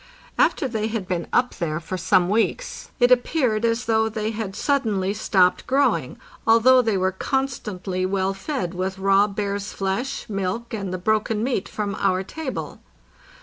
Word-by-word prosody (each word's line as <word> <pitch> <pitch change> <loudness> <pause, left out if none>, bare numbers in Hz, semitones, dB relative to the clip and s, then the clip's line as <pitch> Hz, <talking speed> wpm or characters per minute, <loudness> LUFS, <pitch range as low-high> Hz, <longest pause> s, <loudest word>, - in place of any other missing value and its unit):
After 270 - +2
they 220 -3 -2
had 220 -4 -3
been 175 -3 -2
up 250 0 +2
there 155 -3 -1
for 170 +3 -5
some 185 0 +3
weeks 225 - -1
it 245 0 +4
appeared 245 -3 +2
as 230 +1 +1
though 220 0 +2
they 215 0 -2
had 215 -3 -5
suddenly 215 -10 0
stopped 190 -3 +2
growing, 275 +2 +1 0.3
although 240 +3 +6
they 225 -4 0
were 185 0 +1
con 265 +8 0
stantly 190 -7 -4
well 195 0 0
fed 195 - -3
with 185 +1 -3
raw 195 +1 +4
bear's 200 -1 -3
flesh, 205 +8 -2
milk, 200 +3 -3
and 200 -4 -3
the 185 - -2
broken 215 +3 0
meat 245 -6 -1
from 205 -2 -3
our 190 -1 +1
table. 285 +6 -6
210 Hz, 165 wpm, -23 LUFS, 190-235 Hz, 0.3 s, although